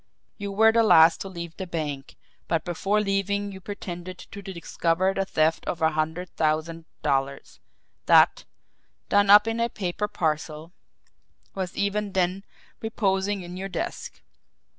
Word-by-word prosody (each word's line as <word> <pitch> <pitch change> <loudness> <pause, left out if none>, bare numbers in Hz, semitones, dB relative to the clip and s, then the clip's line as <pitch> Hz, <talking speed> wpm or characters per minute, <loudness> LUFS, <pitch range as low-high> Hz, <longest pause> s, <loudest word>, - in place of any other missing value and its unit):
You 200 -1 -4
were 220 +3 +5
the 230 +1 +3
last 165 -6 +6
to - - -4
leave 170 -2 -7
the 190 - -5
bank, 150 -5 -5 0.3
but 165 -1 -1
before 195 +4 0
leaving 200 0 -1
you 190 -1 -10
pretended 185 -2 -7
to 200 +2 -10
discover 185 -1 -1
the 195 0 -1
theft 160 -3 +1
of 170 - -2
a 160 -1 +3
hundred 160 +4 -2
thousand 160 +1 -1 0.2
dollars 135 0 -2 0.5
that, - - +5 0.7
done 205 0 +3
up 210 +2 +8
in 225 +1 -1
a 235 0 +1
paper 200 0 -3
parcel, 155 -1 -3 0.8
was 185 -2 -5
even 200 0 -1
then 185 +1 0 0.4
reposing 200 -3 -1
in 175 +1 -8
your 195 +1 -5
desk. 180 - -5
185 Hz, 145 wpm, -25 LUFS, 165-200 Hz, 0.8 s, up